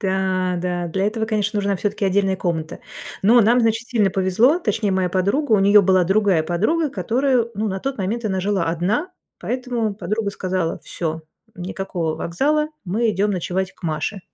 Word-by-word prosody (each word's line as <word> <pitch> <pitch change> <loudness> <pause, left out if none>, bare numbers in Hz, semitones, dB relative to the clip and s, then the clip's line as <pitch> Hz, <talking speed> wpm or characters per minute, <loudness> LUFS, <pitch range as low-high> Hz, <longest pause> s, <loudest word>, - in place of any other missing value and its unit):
Да, 190 -2 0
да. 175 -1 -2
Для 190 +4 0
этого, 220 +1 -1
конечно, 210 -2 -1
нужна 200 -1 0
всё-таки 205 +1 -2
отдельная 195 0 +2
комната. 165 -4 -3 0.4
Но 235 +5 +6
нам, 235 +3 +4
значит, 225 +1 0
сильно 210 -6 +2
повезло, 205 - +3
точнее 210 - -1
моя 185 -1 +1
подруга. 200 - 0
У 210 - +6
неё 200 +1 +6
была 185 -1 +3
другая 195 -3 +2
подруга, 260 - 0
которая, 255 -2 +1
ну, 215 +2 -1
на 190 0 -3
тот 270 -3 -3
момент 220 +5 -2
она 190 -3 -1
жила 195 -2 0
одна, 190 - -1 0.3
поэтому 245 -4 -2
подруга 210 0 -2
сказала: 185 -4 -2
"Всё, 160 -1 -4 0.3
никакого 180 -3 -3
вокзала, 295 - 0 0.2
мы 220 +6 0
идём 205 +1 0
ночевать 185 0 -2
к - - -29
Маше". 160 +5 -2
200 Hz, 170 wpm, -21 LUFS, 185-225 Hz, 0.4 s, Но